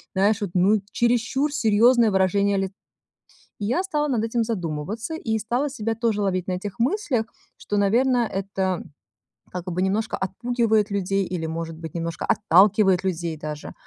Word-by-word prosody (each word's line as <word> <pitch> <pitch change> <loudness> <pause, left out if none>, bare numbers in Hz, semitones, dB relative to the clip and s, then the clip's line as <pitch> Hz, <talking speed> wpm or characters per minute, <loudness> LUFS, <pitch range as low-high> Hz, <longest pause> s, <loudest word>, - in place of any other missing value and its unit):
знаешь, 205 +3 +2
вот, 195 -4 -3
ну, 195 +3 +4
чересчур 245 +5 +1
серьезное 230 -1 +4
выражение 195 +1 +2
ли" 195 0 -1 0.9
И 205 - -3
я 345 +11 +1
стала 300 -5 -1
над 230 -4 0
этим 230 0 0
задумываться, 205 - -4
и 220 -8 -1
стала 245 +6 -1
себя 225 -2 -2
тоже 225 -3 0
ловить 185 -2 -1
на 185 - -1
этих 200 +4 -5
мыслях, 255 - 0 0.3
что, 205 - -3
наверно, 240 +4 +3
это 190 -1 -2 0.7
как 180 0 -5
бы 180 +2 -1
немножко 205 +3 0
отпугивает 220 +1 0
людей 195 0 0
или, 175 -3 -4
может 165 0 -5
быть, 160 -2 -8
немножко 170 -1 -3
отталкивает 195 -1 +4
людей 170 -3 -2
даже. 150 0 -7
205 Hz, 155 wpm, -24 LUFS, 185-235 Hz, 0.9 s, ну